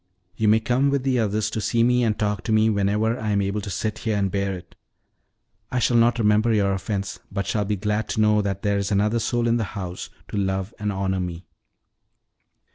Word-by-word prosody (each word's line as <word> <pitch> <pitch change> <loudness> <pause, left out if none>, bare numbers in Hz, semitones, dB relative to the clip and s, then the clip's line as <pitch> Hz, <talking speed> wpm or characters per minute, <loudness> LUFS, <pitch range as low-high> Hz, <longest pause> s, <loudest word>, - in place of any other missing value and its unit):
You 110 - 0
may 110 +1 +5
come 125 +5 +1
with 140 -2 0
the 130 -2 +1
others 105 0 0
to 110 - -2
see 115 +2 +1
me 125 +1 +3
and 110 -2 +1
talk 105 -3 -1
to - - -1
me 110 0 +4
whenever 105 +3 +1
I 110 - -2
am 100 - +2
able 100 +2 -2
to 100 - -6
sit 100 +3 -3
here 110 -2 -1
and 100 -2 0
bear 100 0 -1
it. 85 -1 -14 1.0
I 125 - -1
shall 120 0 +2
not 115 +1 +4
remember 110 +1 +3
your 100 -3 +2
offense, 95 0 -3
but 100 0 -2
shall 105 -2 -1
be 105 +1 0
glad 105 +2 -2
to 110 - 0
know 105 0 +4
that 100 -1 -3
there 100 -1 +1
is 100 - -2
another 105 +3 +2
soul 120 +1 0
in 115 0 +3
the 115 - 0
house 90 -2 -5 0.2
to - - -4
love 95 +1 -1
and 105 -1 -1
honor 95 -1 -1
me." 90 0 -5
105 Hz, 225 wpm, -23 LUFS, 100-110 Hz, 1.0 s, may